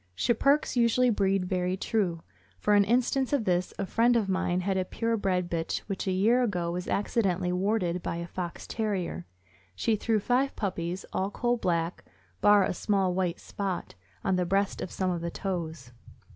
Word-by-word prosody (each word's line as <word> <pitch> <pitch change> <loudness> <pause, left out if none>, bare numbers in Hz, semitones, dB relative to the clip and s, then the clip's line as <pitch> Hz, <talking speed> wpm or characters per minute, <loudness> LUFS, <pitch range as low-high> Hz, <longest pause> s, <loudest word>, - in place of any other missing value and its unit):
Schipperkes 275 - +2
usually 240 +1 +4
breed 195 -3 +1
very 180 0 -1
true. 185 -6 -1 0.3
For 210 - +1
an 205 0 +6
instance 255 +4 +1
of 265 -6 +1
this, 180 -1 +1
a 200 - -1
friend 235 +5 +3
of 220 -4 +2
mine 185 -1 0
had 190 +1 0
a 190 - +1
pure 230 +5 -1
bred 185 -4 0
bitch 165 -1 -2
which 195 -1 -5
a - - +2
year 220 +7 +3
ago 180 -8 0
was 180 +1 -4
accidentally 190 -4 0
warded 180 -2 0
by - - -3
a 170 0 -4
Fox 175 0 -6
Terrier. 190 - -3 0.5
She 220 - +1
threw 220 +1 +1
five 255 +6 +1
puppies, 180 -2 -3
all 190 +1 0
coal 240 +4 0
black, 170 -6 -1 0.4
bar 205 -1 +6
a - - 0
small 190 0 +1
white 180 -2 -1
spot 195 -3 -4 0.3
on 190 - +1
the 180 - +1
breast 195 +2 0
and - - -4
some 185 +1 -1
on 175 -1 -2
the 170 - -2
toes. 165 -9 -4
190 Hz, 185 wpm, -28 LUFS, 180-220 Hz, 0.5 s, an